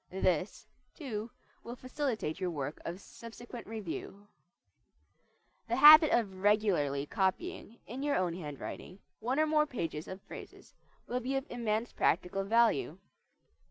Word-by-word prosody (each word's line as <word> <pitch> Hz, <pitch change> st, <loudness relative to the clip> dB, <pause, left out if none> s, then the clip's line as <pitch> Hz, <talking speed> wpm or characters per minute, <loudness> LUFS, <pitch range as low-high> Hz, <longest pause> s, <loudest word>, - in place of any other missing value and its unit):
This, 185 Hz, +1 st, -1 dB, 0.3 s
too, 230 Hz, -7 st, -5 dB, 0.3 s
will 240 Hz, -, -7 dB
facilitate 255 Hz, -, -3 dB
your 185 Hz, -1 st, -1 dB
work 145 Hz, -3 st, -5 dB
of 175 Hz, +2 st, -5 dB
subsequent 235 Hz, +2 st, -10 dB
review. 205 Hz, -1 st, -7 dB, 1.4 s
The 230 Hz, -, 0 dB
habit 305 Hz, +3 st, +10 dB
of 195 Hz, -5 st, +1 dB
regularly 185 Hz, -10 st, +2 dB
copying, 215 Hz, -, -2 dB
in 250 Hz, +4 st, -7 dB
your 290 Hz, 0 st, +1 dB
own 180 Hz, -2 st, 0 dB
handwriting, 165 Hz, +2 st, -7 dB, 0.2 s
one 250 Hz, +6 st, -1 dB
or 310 Hz, -, +4 dB
more 305 Hz, 0 st, +2 dB
pages 165 Hz, -, -4 dB
of 190 Hz, -, -7 dB
phrases -, -, -11 dB, 0.3 s
will 250 Hz, -, -2 dB
be 260 Hz, +2 st, -2 dB
of 270 Hz, 0 st, -1 dB
immense 230 Hz, -1 st, -1 dB
practical 180 Hz, +3 st, +1 dB
value. 220 Hz, -7 st, +2 dB
215 Hz, 130 wpm, -32 LUFS, 185-250 Hz, 1.4 s, habit